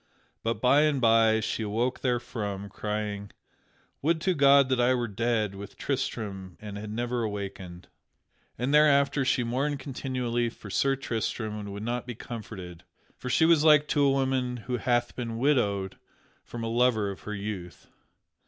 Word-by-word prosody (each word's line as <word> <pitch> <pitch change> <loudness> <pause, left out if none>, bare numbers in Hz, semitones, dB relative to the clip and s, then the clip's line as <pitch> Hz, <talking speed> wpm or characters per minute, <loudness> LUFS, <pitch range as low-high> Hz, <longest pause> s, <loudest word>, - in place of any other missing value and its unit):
But 115 +1 -1
by 135 +3 +5
and 150 -3 +2
by 115 -2 +4
she 110 +1 -2
awoke 115 +4 -1
therefrom, 105 -5 -2
crying, 105 0 -4 0.7
"Would 160 +3 +2
to 185 +2 +2
God 140 -3 +5
that 130 -1 +1
I 125 +1 +4
were 120 -1 -1
dead 110 -1 0
with 100 0 -9
Tristram 100 -9 -3
and 105 -1 -8
had 105 +1 -6
never 120 +2 -2
awakened!" 100 -4 -5 0.7
And 125 +5 -1
thereafter 140 -2 +4
she 130 -1 +1
mourned 135 +5 -1
continually 125 -3 -2
for 105 -2 -11
Sir 135 +6 +2
Tristram 110 -4 -3
and 100 -1 -6
would 100 +1 -6
not 120 +2 -3
be 125 - -5
comforted; 95 -7 -8 0.3
for 125 - -6
she 160 - +4
was 165 -2 +5
like 150 -1 +6
to 145 - +2
a 140 - +5
woman 130 -2 0
who 125 +2 -3
hath 120 +1 0
been 115 -2 -4
widowed 105 -8 +1 0.4
from 120 -1 -7
a - - -2
lover 115 -3 +2
of 95 - -9
her 105 - -5
youth. 100 -5 -6
120 Hz, 165 wpm, -28 LUFS, 105-130 Hz, 0.7 s, like